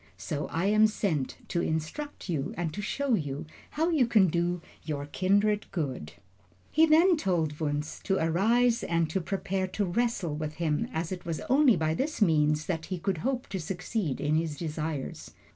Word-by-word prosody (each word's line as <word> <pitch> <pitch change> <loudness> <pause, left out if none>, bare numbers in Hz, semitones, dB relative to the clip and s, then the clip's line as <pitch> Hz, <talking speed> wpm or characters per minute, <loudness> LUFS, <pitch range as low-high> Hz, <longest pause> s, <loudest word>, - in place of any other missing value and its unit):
So 145 - -3
I 165 +3 -1
am 215 +2 +5
sent 170 -11 -1
to 170 - 0
instruct 160 - -3
you 155 -5 -2
and 165 -3 -2
to 205 - -4
show 270 +5 -1
you 145 -5 -1 0.2
how 320 +3 0
you 280 -8 +3
can 210 -6 +5
do 175 +2 0 0.2
your 145 -2 -4
kindred 205 +6 +1
good." 130 - -3 0.6
He 320 +1 +5
then 330 +3 +5
told 165 - 0
Wunzh 150 -1 -2
to 195 - +2
arise 225 +9 +3
and 170 -1 +1
to 190 - 0
prepare 190 +1 -2
to 200 +2 -1
wrestle 190 -4 0
with 155 0 -4
him, 155 -3 -1
as 160 +2 -3
it 180 -1 -5
was 165 -2 -3
only 265 -3 +4
by 160 0 0
this 290 - -2
means 155 -5 +3
that 160 -3 -3
he 185 - -3
could 190 -1 -1
hope 255 +5 -1
to 190 - -3
succeed 180 - -3
in 150 +1 +1
his 160 -2 -2
desires. 155 -3 -4
175 Hz, 180 wpm, -29 LUFS, 155-215 Hz, 0.6 s, am